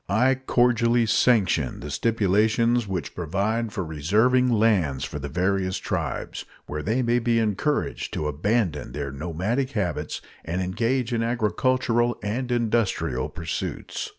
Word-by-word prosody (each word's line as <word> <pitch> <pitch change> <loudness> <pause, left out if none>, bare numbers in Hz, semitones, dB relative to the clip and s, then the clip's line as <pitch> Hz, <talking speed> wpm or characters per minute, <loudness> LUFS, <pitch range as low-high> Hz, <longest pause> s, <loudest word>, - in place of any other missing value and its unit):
I 125 +7 +4
cordially 120 -2 +2
sanction 105 - +2
the 75 +2 -6
stipulations 110 +3 +2
which 90 -6 -4
provide 100 +7 -1
for 95 - -3
reserving 110 - +2
lands 105 - +2
for 75 - -6
the 70 0 -5
various 95 +2 0
tribes, - - -3 0.2
where 75 +1 -4
they 115 +9 0
may 120 +1 +2
be 120 -1 +1
encouraged 115 +7 -1
to 75 - -2
abandon 80 - -1
their 70 -1 -4
nomadic 90 - -2
habits 100 -6 -2 0.2
and 85 +3 -3
engage 115 +7 0
in 115 - +1
agricultural 120 +1 +1
and 120 +5 -2
industrial 115 - 0
pursuits. - - -4
110 Hz, 130 wpm, -25 LUFS, 90-120 Hz, 0.2 s, I